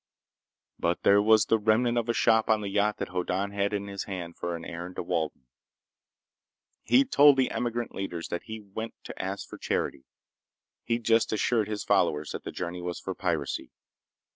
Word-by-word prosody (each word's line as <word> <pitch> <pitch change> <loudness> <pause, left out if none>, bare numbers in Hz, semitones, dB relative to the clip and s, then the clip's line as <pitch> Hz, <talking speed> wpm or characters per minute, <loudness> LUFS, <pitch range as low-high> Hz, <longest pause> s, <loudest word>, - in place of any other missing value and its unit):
But 85 0 0
there 100 +1 +6
was 110 +1 +5
the 115 - +2
remnant 115 +3 +2
of 120 -1 0
a - - +3
shop 110 -1 +3
on 110 -1 +3
the 100 - -3
yacht 105 +1 +1
that - - -4
Hoddan 90 +2 -1
had 100 0 0
in 100 -1 -2
hand 95 -3 -5
for 85 -1 -3
his 85 - -10
errand 85 +2 -7
to - - -3
Walden. 80 -6 -2 1.4
He'd 270 +1 +3
told 145 -1 +7
the 130 -2 +2
emigrant 120 -1 -2
leaders 90 -4 -4
that 85 - -4
he 110 0 -6
went 110 +3 -7
to - - -7
ask - - -4
for - - -10
charity. 65 - -2 0.8
He'd 115 0 -1
just 115 0 +3
assured 110 0 +1
his 105 -1 -3
followers 75 0 +1
that - - -6
their - - -5
journey 90 0 -5
was 90 0 -4
for 95 - -4
piracy. 85 -6 -2
100 Hz, 185 wpm, -28 LUFS, 90-110 Hz, 1.4 s, told